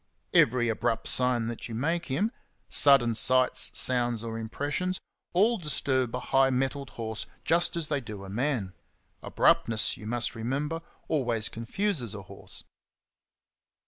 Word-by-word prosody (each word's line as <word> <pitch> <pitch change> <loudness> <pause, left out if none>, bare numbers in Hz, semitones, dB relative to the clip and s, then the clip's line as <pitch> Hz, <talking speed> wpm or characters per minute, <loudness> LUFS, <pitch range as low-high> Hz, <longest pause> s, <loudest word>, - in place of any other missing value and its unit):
Every 120 0 +4
abrupt 115 0 -1
sign 125 -2 +2
that 120 0 -6
you 115 - -5
make 165 +8 -1
him 200 +12 0 0.2
— - - -43
sudden 135 -5 +6
sights, 130 +2 +3
sounds, 120 -3 +1
or 115 -1 -5
impressions 145 +11 -2 0.2
— - - -52
all 220 +5 +4
disturb 130 -6 0
a - - -2
high 135 +1 +3
mettled 135 +1 -1
horse 110 -1 -4 0.2
just 170 +1 +2
as 165 -3 -2
they 145 -2 -1
do 105 -4 -8
a - - -8
man. 120 -5 -1 0.5
[Abruptness, 110 -1 +2
you 105 - -9
must 120 +1 0
re 115 - -8
member, 145 +7 -2 0.3
always 120 -7 0
confuses 120 - -1
a 100 - -7
horse. - - -4
125 Hz, 150 wpm, -28 LUFS, 115-145 Hz, 0.5 s, sudden